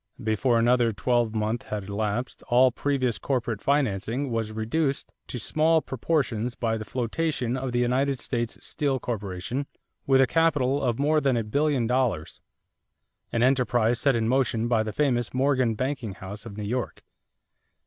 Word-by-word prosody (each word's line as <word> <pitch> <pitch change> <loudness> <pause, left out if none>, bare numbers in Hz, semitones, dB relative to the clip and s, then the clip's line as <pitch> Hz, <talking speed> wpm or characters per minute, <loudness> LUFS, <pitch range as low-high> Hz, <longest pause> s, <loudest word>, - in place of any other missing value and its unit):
Before 115 +3 +2
another 120 0 +3
twelvemonth 115 -1 0
had 105 -2 -3
elapsed 105 +5 -3
all 125 +1 +5
previous 130 -2 -1
corporate 120 -6 -2
financing 130 -1 0
was 115 -2 -1
reduced 135 +7 -2
to - - -5
small 160 +7 +3
proportions 125 -4 -1
by 115 -2 -1
the 110 -1 -5
flotation 125 +1 -1
of 130 -1 -3
the 120 - -1
United 130 +3 +1
States 120 -2 -2
Steel 140 -4 -1
Corporation 115 +4 -4 0.4
with 135 -1 +5
a 135 - +6
capital 145 -3 +2
of 120 -3 0
more 150 +2 +2
than 135 -3 +2
a 115 - 0
billion 140 +3 +1
dollars, 120 -9 -1 0.9
an 115 0 +1
enterprise 125 -3 +2
set 135 0 +3
in 110 -1 0
motion 120 -2 +1
by 115 -2 +2
the 110 0 -3
famous 120 -1 0
Morgan 130 -3 +2
banking 130 -3 -3
house 100 +4 -8
of 100 -2 -9
New 105 - -4
York. 120 +2 -3
125 Hz, 155 wpm, -26 LUFS, 110-135 Hz, 0.9 s, a